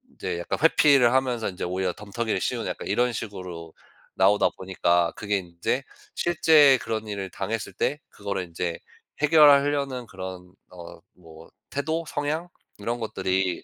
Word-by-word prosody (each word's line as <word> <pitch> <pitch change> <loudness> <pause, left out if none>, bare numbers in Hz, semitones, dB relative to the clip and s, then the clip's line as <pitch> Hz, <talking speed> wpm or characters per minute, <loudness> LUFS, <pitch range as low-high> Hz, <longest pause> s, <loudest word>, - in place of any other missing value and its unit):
이제 85 -2 -4
약간 85 - -3
회피를 140 -6 +5
하면서 125 -4 +1
인제 90 - -5
오히려 90 0 -1
덤터기를 105 -1 -3
씌우는 - - -2
약간 - - -5
이런 125 0 +1
식으로 90 -6 -7 0.4
나오다 100 +2 +4
보니까 85 -2 +1
그게 105 -1 -1
인제 90 +9 -3 0.3
실제 155 -6 +5
그런 110 -1 -3
일을 100 -2 -4
당했을 100 +1 -4
때 150 +10 -1
그거를 100 -3 -4
인제 85 0 -4 0.4
해결하려는 145 -4 +4
그런 95 -1 -8 0.2
어 85 -1 -11
뭐 80 -2 -15 0.2
태도 160 +4 -2
성향 155 +4 -3 0.3
이런 120 +4 -3
것들이 95 -4 -1
105 Hz, 315 characters per minute, -25 LUFS, 90-135 Hz, 0.4 s, 회피를